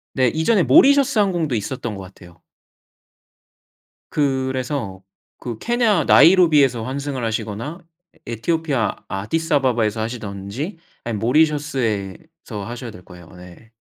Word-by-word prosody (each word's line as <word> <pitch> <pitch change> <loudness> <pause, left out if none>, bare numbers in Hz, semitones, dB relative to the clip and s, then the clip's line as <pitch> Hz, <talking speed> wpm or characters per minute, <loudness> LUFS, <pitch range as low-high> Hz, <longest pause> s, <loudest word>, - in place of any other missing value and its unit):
네. 130 -2 +3
이전에 160 - +2
모리셔스 280 - +5
항공도 175 - +1
있었던 115 +1 -4
것 95 - -8
같아요. 90 -3 -16 1.7
그래서 130 -7 -2 0.4
그 120 -3 -6
케냐 230 - +1
나이로비에서 150 -9 +5
환승을 135 0 -4
하시거나 115 - -4 0.4
에 - - -26
에티오피아 145 -1 -1
아디스아바바에서 120 - 0
하시든지 110 - -5 0.3
아니면 115 -3 -3
모리셔스에서 130 - -1
하셔야 120 +2 -7
될 90 -3 -14
거예요 90 -1 -14
네. 90 +5 -15
130 Hz, 310 characters per minute, -20 LUFS, 105-160 Hz, 1.7 s, 모리셔스